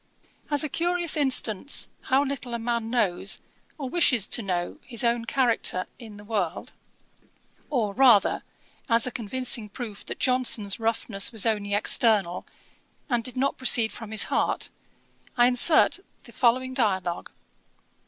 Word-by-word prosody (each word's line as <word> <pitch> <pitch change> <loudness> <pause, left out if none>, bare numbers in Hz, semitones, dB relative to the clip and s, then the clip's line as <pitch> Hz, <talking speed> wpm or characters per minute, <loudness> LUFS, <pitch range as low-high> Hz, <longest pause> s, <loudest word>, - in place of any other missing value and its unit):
As 290 0 +3
a - - -1
curious 345 +2 0
instance 265 -5 +1 0.2
how 265 +2 +2
little 260 -3 -5
a - - -1
man 230 -1 -3
knows, 200 -5 0 0.4
or 280 -4 -5
wishes 255 - +2
to - - +4
know, 180 -4 -3
his 240 -2 -6
own 235 -1 0
character 235 -8 0
in 220 -4 -11
the 205 - -12
world, 205 -6 -3 1.0
or, 225 -8 -1
rather, 235 -5 +4 0.5
as 230 0 +3
a 250 - -3
convincing 240 -1 -1
proof 215 -1 -8
that - - -6
Johnson's 245 -6 +1
roughness 225 -3 -1
was 220 -4 -1
only 205 -2 0
external, 205 -4 +2 0.6
and 240 -1 +1
did 255 +2 -4
not 275 +2 -1
proceed 235 -3 +4
from 225 -2 -8
his 220 -1 +3
heart, - - -1 0.7
I 240 - +5
insert 255 +8 +4 0.2
the 235 - -15
following 255 +2 +1
dialogue. 190 -8 -1
235 Hz, 145 wpm, -25 LUFS, 210-255 Hz, 1.0 s, I